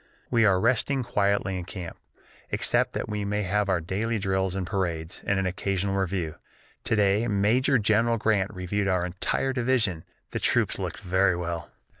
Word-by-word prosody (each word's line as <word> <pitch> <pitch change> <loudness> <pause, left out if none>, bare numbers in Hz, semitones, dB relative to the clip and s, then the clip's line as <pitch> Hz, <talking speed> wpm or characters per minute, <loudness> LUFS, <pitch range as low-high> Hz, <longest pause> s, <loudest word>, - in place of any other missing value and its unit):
We 115 -2 +4
are 95 -3 +4
resting 130 +4 +1
quietly 100 -4 0
in 90 - -6
camp, 90 -2 -7 0.5
except - - +1
that - - -3
we 105 -1 -3
have 105 0 0
our 95 -2 +2
daily 105 +7 -2
drills 95 -2 0
and 95 -2 -2
parades 85 -5 -3
and 100 - +2
an 95 - 0
occasional 95 +1 -1
review. 95 -5 -2 0.5
To - - +2
day 105 +2 +2
Major 115 +6 +3
General 115 +2 +2
Grant 105 -3 +1
reviewed 95 +1 -2
our 90 -2 +1
entire 95 +8 -1
division; 120 -9 +1 0.3
the - - -2
troops - - +1
looked - - -4
very 95 0 +2
well." 85 -1 -4
100 Hz, 165 wpm, -26 LUFS, 90-110 Hz, 0.5 s, We